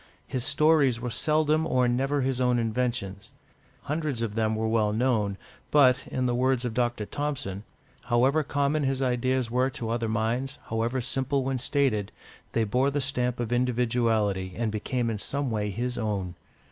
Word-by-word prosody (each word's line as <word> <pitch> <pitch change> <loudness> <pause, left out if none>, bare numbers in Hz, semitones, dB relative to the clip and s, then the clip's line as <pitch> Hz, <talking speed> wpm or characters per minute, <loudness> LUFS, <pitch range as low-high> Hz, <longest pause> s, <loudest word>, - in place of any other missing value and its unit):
His 130 -2 -3
stories 150 -5 +3
were 120 0 -4
seldom 155 +3 +2
or 125 -4 +2
never 135 +4 +1
his 130 -1 -1
own 125 -1 +3
inventions; 110 -4 -2 0.5
hundreds 145 -4 -2
of 110 -3 -3
them 110 0 0
were 110 +1 -1
well 110 -2 +2
known, 110 -4 +1 0.3
but, 130 -3 +4
in 130 - -2
the 120 - +1
words 130 0 +1
of 120 - -2
Dr. 120 -3 0
Thompson, 140 -9 -3 0.4
"however 130 +5 +3
common 145 +1 0
his 135 -1 0
ideas 130 -1 0
were 125 +2 +2
to 125 -5 -4
other 115 -1 -1
minds, 115 +5 -1
however 115 +3 -1
simple 135 +2 0
when 130 -1 -1
stated, 125 -7 +1 0.4
they 115 - +2
bore 125 +6 +2
the 145 +1 -1
stamp 125 -3 -1
of 120 0 -2
individuality, 115 -6 +1
and 115 -2 -1
became 115 +3 -2
in 105 - -4
some 140 +3 -2
way 105 -1 -1
his 120 +5 -3
own." 100 -5 -2
125 Hz, 170 wpm, -27 LUFS, 110-135 Hz, 0.5 s, but